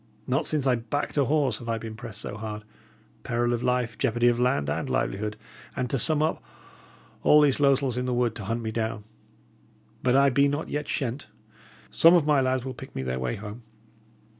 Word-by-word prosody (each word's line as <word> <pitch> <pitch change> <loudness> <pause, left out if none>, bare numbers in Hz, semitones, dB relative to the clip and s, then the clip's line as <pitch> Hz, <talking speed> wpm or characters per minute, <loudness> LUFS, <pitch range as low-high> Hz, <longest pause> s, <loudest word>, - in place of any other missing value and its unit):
Not 135 +5 0
since 150 -3 0
I 130 - +4
backed 120 +5 -3
a 140 -2 +3
horse 145 -1 +1
have 115 - -8
I 115 - 0
been 110 0 -7
pressed 110 -2 -7
so 105 - -5
hard; 105 0 -6 0.6
peril 120 +1 0
of 120 - -2
life, 125 -2 -1
jeopardy 120 +1 +2
of 120 0 0
land 125 - +1
and 75 - -2
livelihood, 105 +2 -2 0.4
and 125 -1 -2
to 135 - 0
sum 155 +5 +3
up, 160 - -1 0.8
all 150 - +6
these 145 -2 +3
losels 135 -3 +2
in 125 - -1
the 125 - 0
wood 120 -2 +1
to 105 - -7
hunt 115 +3 -2
me 110 - -3
down. 110 -1 -3 1.0
But 125 0 +2
I 140 0 +5
be 140 +3 +4
not 145 +2 -3
yet 150 0 -3
shent. 130 +1 -3 0.6
Some 165 +2 +6
of 165 -4 +3
my 150 -2 +3
lads 130 -1 0
will 130 - -4
pick - - -11
me 65 - -3
their 65 0 -3
way 65 -1 -2
home. 105 +3 -8
125 Hz, 210 wpm, -26 LUFS, 110-140 Hz, 1.0 s, all